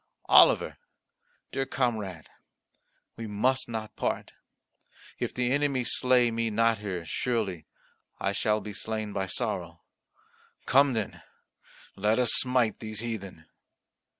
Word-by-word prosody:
Oliver, - - +6 0.7
dear 135 0 -2
comrade, 110 - -2 0.9
we 115 -1 -5
must 125 +6 0
not 110 -2 -5
part. - - -2 0.9
If - - -2
the 125 0 -1
enemy 140 -2 +1
slay 125 -1 +3
me 115 0 -1
not 115 0 +2
here, 95 -5 -5
surely 100 -4 -2 0.5
I 100 - 0
shall 105 +2 +1
be 105 +1 -7
slain 110 0 -4
by 95 -1 -2
sorrow. 90 - -3 0.8
Come 140 0 +4
then, 110 -4 -3 0.7
let 105 +3 +1
us 125 -3 +4
smite 125 -4 +2
these 110 -1 -4
heathen." 100 -8 -6
110 Hz, 120 wpm, -28 LUFS, 105-125 Hz, 0.9 s, Oliver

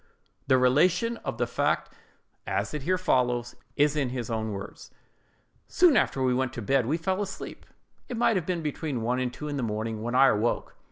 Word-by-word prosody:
The 130 -1 +5
relation 180 - +3
of - - -5
the - - +1
fact, - - -1 0.5
as - - -1
it 150 - -3
here 185 +7 +1
follows, 125 -8 0 0.2
is 145 +1 +3
in 140 -4 0
his 120 -2 -4
own 110 -1 -2
words:— 100 -1 -8 0.8
"Soon 345 -6 +4
after 135 - +2
we 130 -1 +2
went 130 0 -1
to 120 - -5
bed, 135 +1 +2
we 155 +5 +1
fell 185 +4 -1
asleep: 195 -1 -7 0.4
it 245 - -4
might 230 -1 +3
have 180 -4 -1
been 175 -3 -1
between 145 -5 -3
one 125 +2 0
and 125 -1 -1
two 150 +4 -7
in 145 -1 -3
the - - -1
morning 110 -1 -3
when 120 +2 -3
I 135 +1 +7
awoke. 110 +3 0
130 Hz, 205 wpm, -27 LUFS, 120-165 Hz, 0.8 s, I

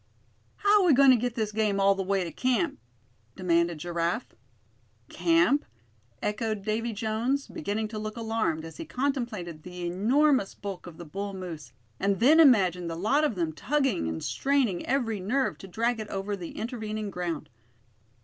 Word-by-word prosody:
"How're 410 0 +4
we 335 - +6
goin' 270 0 +7
to - - +7
get 240 0 -2
this 215 -2 -1
game 210 -2 +1
all 195 0 +5
the 195 - -3
way 195 0 0
to 170 - -5
camp?" 255 +5 0 0.6
demanded 170 -2 +1
Giraffe. 170 +6 -2 0.8
"Camp?" 330 -4 +3 0.6
echoed 215 -1 -2
Davy 225 +3 -1
Jones, 225 +6 -1
beginning 220 -8 -3
to 215 -1 -5
look 215 +1 -5
alarmed, 220 -8 -1
as 165 - -10
he - - -5
contemplated 235 - -3
the 180 +1 -7
enormous 235 - +2
bulk 195 -3 -7
of 165 -2 -10
the 175 - -9
bull 195 +5 -5
moose, 165 -8 -7 0.3
and 195 -1 +1
then 290 +8 +6
imagined 185 - +5
the 165 - -4
lot 220 - +2
of 295 -8 +1
them 165 -3 -1
tugging 270 - 0
and 80 0 -4
straining 270 -10 +1
every 240 -6 0
nerve 255 +9 0
to 195 - -9
drag 230 +5 0
it 215 - -5
over 200 +1 -3
the 175 -4 -8
intervening 215 -3 -4
ground. 175 -7 -4
215 Hz, 170 wpm, -28 LUFS, 180-250 Hz, 0.8 s, goin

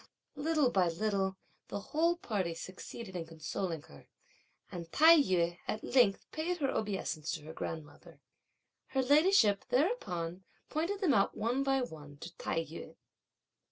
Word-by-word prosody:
Little 295 -3 +2
by 185 -5 +3
little 190 +1 -1 0.3
the 205 - -4
whole 335 +3 +3
party 190 - -2
succeeded 190 +3 -8
in 165 -2 -4
consoling 165 +1 -4
her, 70 0 -16 0.6
and 170 -2 -7
Tai 320 +2 +8
yü 175 -6 +1
at 215 - -3
length 240 -6 +3
paid 345 +3 -2
her 275 -5 0
obeisance 190 -7 -2
to - - -5
her 155 +1 -8
grandmother. 160 -2 -7 0.7
Her 265 -1 0
ladyship 285 - +5
thereupon 190 - 0 0.3
pointed 350 +7 -1
them 340 -8 +3
out 195 -4 +2
one 240 +5 0
by 270 -1 +2
one 150 -9 -9
to 170 +3 -9
Tai 165 0 -2
yü. 160 +2 -9
200 Hz, 145 wpm, -33 LUFS, 170-280 Hz, 0.7 s, Tai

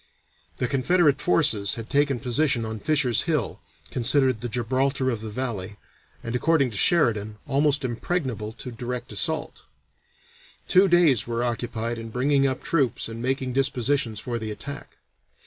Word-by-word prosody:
The 125 - -1
Confederate 145 +3 +2
forces 145 - +2
had 115 -1 -7
taken 140 -2 +1
position 125 0 +1
on 110 0 -5
Fisher's 140 -4 +2
Hill, 150 -10 -1 0.3
considered 130 -1 +2
the 120 - -4
Gibraltar 130 +3 0
of 115 -3 -4
the 110 - -5
Valley, 105 -4 -4 0.5
and 115 +1 -4
according 140 -1 +2
to - - -8
Sheridan, 110 - +2
almost 145 0 +1
impregnable 120 - -3
to 125 - -7
a - - -8
direct 120 +1 -5
assault. 160 -1 -1 1.0
Two 195 +1 +5
days 170 - +4
were 120 0 -1
occupied 120 -1 -2
in 115 0 -7
bringing 135 +4 +2
up 130 - -3
troops 135 -9 0
and 115 0 -7
making 130 0 -1
dispositions 130 -3 0
for 120 +1 -4
the 110 -1 -5
attack. 140 +7 -8
125 Hz, 150 wpm, -25 LUFS, 115-140 Hz, 1.0 s, Two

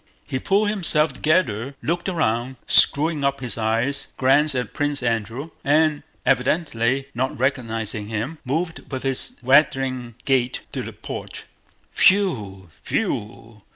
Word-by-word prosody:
He 130 - -3
pulled 200 +8 +2
himself 160 -7 +3
together, 135 - 0
looked 170 +4 -1
round, 130 -8 -1
screwing 150 0 +4
up 140 0 0
his 125 -3 -1
eyes, 115 +5 -1
glanced 140 +3 +3
at 125 -1 -3
Prince 145 -2 -1
Andrew, 115 +6 -2
and, 150 +1 +2 0.2
evidently 135 -1 +1
not 130 +4 -2
recognizing 115 -5 -1
him, 115 +9 -4
moved 160 +6 -3
with 130 -1 -4
his 135 -1 -1
waddling 130 -3 +2
gait 130 -3 +1
to - - -3
the - - -6
porch. - - -8 0.5
"Whew... 105 - +2
whew... 110 +1 -3
135 Hz, 125 wpm, -22 LUFS, 115-150 Hz, 0.5 s, screwing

